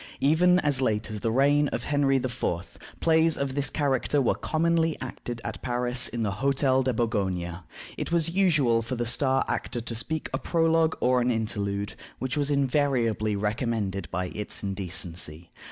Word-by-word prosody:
Even 175 +5 +4
as 145 -3 +1
late 110 -3 0
as 105 - -4
the 110 +3 -1
reign 145 +4 +3
of 120 -3 -3
Henry 145 -2 +2
IV., 130 -1 -2 0.6
plays 160 0 +3
of 140 -1 -2
this 135 -2 0
character 145 0 0
were 130 - +2
commonly 165 0 0
acted 120 -2 -6
at - - -6
Paris 125 0 +1
at 120 -1 -2
the 105 - 0
Hotel 135 +3 +1
de 130 0 +1
Bourgogne. 95 -7 -1 0.4
It - - -3
was 170 -1 +2
usual 155 -11 +3
for 115 +3 -4
the 120 0 -2
star 130 +3 +2
actor 120 - -2
to 115 0 -5
speak 155 +7 -3
a - - 0
prologue 165 -1 +2
or 125 0 +3
an 120 - +1
interlude, 100 -3 -1 0.2
which 130 -1 -3
was 145 -1 0
invariably 130 -6 +1
recommended 105 - -2
by 90 0 -2
its 105 0 -3
indecency. 90 -4 -3
125 Hz, 170 wpm, -26 LUFS, 110-145 Hz, 0.6 s, Even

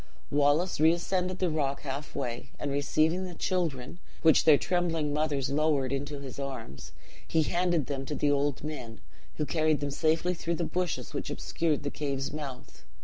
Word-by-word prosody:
"Wallace 145 +5 +3
reascended 180 +3 +2
the 180 -3 +1
rock 140 -3 -1
half 140 +1 -5
way; 120 -3 -3
and 145 - -3
receiving 155 +5 +2
the 180 -2 -6
children, 165 -5 -2 0.2
which 160 -2 +6
their 155 -2 +8
trembling 165 -4 0
mothers 145 -3 0
lowered 140 -3 +2
into 145 +1 -3
this 140 -1 -8
arms, 130 - -6 0.4
he 160 -1 +3
handed 175 -2 +1
them 135 0 -4
to 150 - -2
the 145 0 +2
old 145 -1 +1
men, 125 -7 -6 0.4
who 150 - -1
carried 155 +1 +2
them 145 -1 -2
safely 160 +4 +2
through 170 0 -2
the 170 - -2
bushes 180 +1 -2
which - - -3
obscured 155 -3 -1
the 145 - -2
cave's 140 -2 -3
mouth. 135 - -7
150 Hz, 170 wpm, -29 LUFS, 140-165 Hz, 0.4 s, their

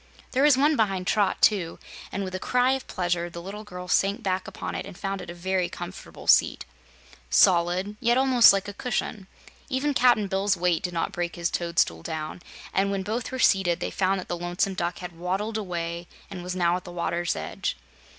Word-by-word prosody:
There 260 - +1
was 290 -2 +6
one 295 +3 +4
behind 195 -6 0
Trot, 205 0 +1
too, 185 -6 +3 0.3
and 200 - -3
with 185 -1 -5
a 185 - -3
cry 250 +4 +2
of 265 -1 -2
pleasure 175 -1 -1
the 170 - -8
little 200 +4 -7
girl 180 -3 -8
sank 195 +3 +1
back 185 -1 -1
upon - - -6
it - - -3
and 195 -2 -10
found 195 -1 -3
it 180 - -9
a - - -5
very 185 +1 -1
comfortable - - -9
seat - - +4 0.6
solid, 180 - +3
yet 240 -1 +3
almost 260 -3 +7
like 195 0 0
a 205 - -6
cushion. 210 -3 -3 0.4
Even 285 +2 0
Cap'n 245 -5 +4
Bill's 195 0 +1
weight 175 -1 +1
did 180 -1 -3
not 165 - -1
break 175 0 -3
his 170 0 -1
toadstool 170 - 0
down, 155 - -5 0.3
and 195 +1 +2
when 195 -1 -1
both 225 +4 -3
were 260 - -3
seated, 190 -8 +3
they - - -3
found 195 0 +1
that 180 - -7
the 175 - -2
Lonesome 175 +3 -1
Duck 175 -1 -2
had 180 -1 -7
waddled 195 +5 -2
away 170 -3 -4 0.2
and 185 -3 -6
was 180 +1 -4
now 175 -1 +2
at 180 - -9
the 175 - -9
water's 175 0 -1
edge. 80 0 -3
185 Hz, 210 wpm, -26 LUFS, 175-210 Hz, 0.6 s, almost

